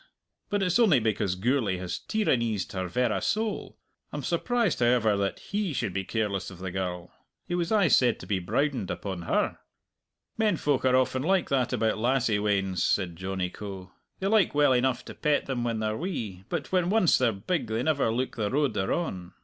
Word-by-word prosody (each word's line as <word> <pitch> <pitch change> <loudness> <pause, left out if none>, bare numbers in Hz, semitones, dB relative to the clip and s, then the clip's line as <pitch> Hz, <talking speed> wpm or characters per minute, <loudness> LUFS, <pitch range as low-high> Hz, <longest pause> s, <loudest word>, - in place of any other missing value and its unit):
But 205 -1 0
it's 180 +4 +2
only 190 - +5
because 105 -4 0
Gourlay 110 -1 +1
has 90 -1 -4
tyraneezed 115 - 0
her 95 -1 -3
verra 120 +4 0
soul. 220 0 -2 0.3
I'm - - -5
surprised, 240 -7 0
however, 120 -3 +3
that 100 0 -1
he 200 -4 -3
should 110 -7 -2
be 95 0 -1
careless 100 -4 -2
of 95 - -11
the 95 +1 -5
girl. 90 -2 -4 0.3
He - - -3
was 175 +1 -1
aye 205 -5 +4
said 125 -6 +4
to - - -8
be 100 -2 0
browdened 120 +4 -1
upon 95 -3 -4
her." - - +1 0.8
"Men 210 -5 +2
folk 145 -3 0
are 130 0 +4
often 130 0 +2
like 185 +5 +1
that 130 -3 +1
about 110 0 0
lassie 120 -3 +2
weans," 95 -3 0
said 90 -4 0
Johnny 95 0 -3
Coe. 95 -3 -8 0.3
"They 190 - -5
like 205 -6 +3
well 145 -2 +5
enough 125 0 +1
to - - -8
pet 150 -1 +1
them 130 -3 -2
when 115 -2 -1
they're 110 0 -1
wee, 110 - -4
but 165 -5 -3
when 180 -2 +2
once 205 -4 +4
they're 125 -3 +3
big 120 - -2
they 110 +2 -1
never 140 -6 +1
look 125 +3 -2
the 105 -2 0
road 140 +2 +1
they're 95 - -1
on! 95 - -3
120 Hz, 200 wpm, -27 LUFS, 100-150 Hz, 0.8 s, only